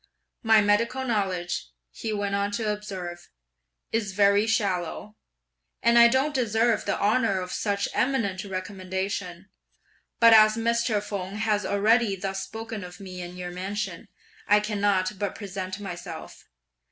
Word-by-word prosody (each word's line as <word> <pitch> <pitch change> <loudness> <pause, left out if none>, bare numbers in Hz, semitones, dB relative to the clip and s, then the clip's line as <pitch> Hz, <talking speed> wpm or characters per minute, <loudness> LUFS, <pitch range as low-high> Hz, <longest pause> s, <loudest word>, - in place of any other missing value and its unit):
My 225 -2 +5
medical 230 +6 +1
knowledge,' 185 - -1 0.2
he 225 - -5
went 205 -1 -2
on 200 0 0
to 210 0 0
observe, 185 -4 -7 0.6
'is 210 -4 -1
very 200 +2 +4
shallow, 205 -1 -1 0.7
and 235 0 +5
I 235 - +9
don't 265 +5 +1
deserve 230 -3 +1
the - - -1
honour 210 -2 +2
of 180 0 -5
such 200 -1 -1
eminent 230 -8 0
recommendation; 190 -1 -4 0.7
but 230 -1 +8
as 215 -1 +7
Mr. 230 -2 +1
Feng 195 -2 -5
has 210 -1 0
already 215 +1 +3
thus 195 0 -4
spoken 225 -1 -6
of 180 +1 -10
me 185 -2 -8
in 175 +1 -8
your 180 0 -5
mansion, 195 +4 -4 0.4
I 210 +1 +6
can't 205 -2 0
but 205 -2 -2
present 190 -1 -5
myself. 185 -4 -8
205 Hz, 140 wpm, -26 LUFS, 190-220 Hz, 0.7 s, I